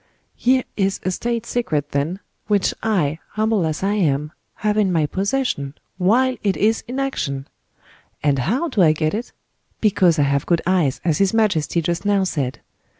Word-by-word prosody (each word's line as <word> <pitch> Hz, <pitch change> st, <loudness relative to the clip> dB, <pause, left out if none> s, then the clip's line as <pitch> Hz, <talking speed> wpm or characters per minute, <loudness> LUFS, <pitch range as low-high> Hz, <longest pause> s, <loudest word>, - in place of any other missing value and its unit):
Here 255 Hz, +1 st, +2 dB
is 195 Hz, -1 st, 0 dB
a 185 Hz, -, 0 dB
state 235 Hz, +4 st, -2 dB
secret, 150 Hz, -14 st, -1 dB
then, 155 Hz, +8 st, -1 dB, 0.3 s
which 205 Hz, -3 st, +2 dB
I, 165 Hz, -9 st, 0 dB
humble 215 Hz, -5 st, +1 dB
as 155 Hz, +3 st, -3 dB
I 200 Hz, +1 st, +1 dB
am, 150 Hz, -7 st, 0 dB, 0.2 s
have 210 Hz, -1 st, 0 dB
in 205 Hz, -3 st, +2 dB
my 160 Hz, -3 st, +2 dB
possession, 190 Hz, -, -1 dB, 0.2 s
while 250 Hz, +8 st, +3 dB
it 200 Hz, -2 st, 0 dB
is 220 Hz, +2 st, +2 dB
in 255 Hz, +3 st, -4 dB
action. 140 Hz, -, -2 dB, 0.8 s
And 140 Hz, -2 st, +2 dB
how 240 Hz, -, 0 dB
do 240 Hz, -, +1 dB
I 155 Hz, -3 st, +6 dB
get 155 Hz, 0 st, -1 dB
it? 225 Hz, +4 st, -4 dB, 0.5 s
Because 185 Hz, -6 st, +3 dB
I 145 Hz, -, +3 dB
have 140 Hz, 0 st, 0 dB
good 170 Hz, -2 st, +2 dB
eyes, 175 Hz, -7 st, +1 dB
as 160 Hz, -4 st, +1 dB
his 195 Hz, +2 st, +2 dB
majesty 175 Hz, -6 st, +1 dB
just 170 Hz, +2 st, -1 dB
now 200 Hz, -1 st, +2 dB
said. 140 Hz, -8 st, -2 dB
185 Hz, 175 wpm, -21 LUFS, 155-215 Hz, 0.8 s, I